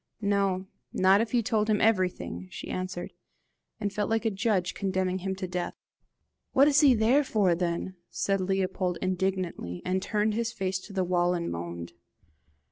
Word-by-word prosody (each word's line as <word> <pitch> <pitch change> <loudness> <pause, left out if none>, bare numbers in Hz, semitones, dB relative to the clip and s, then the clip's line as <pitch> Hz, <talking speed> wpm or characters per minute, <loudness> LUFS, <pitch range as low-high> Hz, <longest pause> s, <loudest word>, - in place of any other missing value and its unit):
"No, 195 -2 +1 0.3
not 190 +2 +4
if 225 -2 -2
you 240 -2 +2
told 215 0 +1
him 210 -1 +3
everything," 180 - 0
she 90 - -7
answered, 185 -1 -4 0.7
and 205 -2 -2
felt 210 -1 -1
like 225 +1 0
a 225 - +2
judge 195 -3 0
condemning 190 -1 -1
him 190 +1 -3
to 190 -1 -4
death. 180 0 -3 0.8
"What 275 +2 +6
is 290 0 +5
he 275 -4 +6
there 235 +7 +4
for 205 -8 +2
then?" 175 +2 -2
said 195 -1 0
Leopold 185 -1 0
indignantly, 185 - -2
and 185 +1 0
turned 210 +2 0
his 230 +1 -1
face 190 -2 -2
to - - -11
the 190 -1 +1
wall 175 0 +2
and 170 -1 -2
moaned. 85 0 -6
190 Hz, 170 wpm, -28 LUFS, 180-210 Hz, 0.8 s, What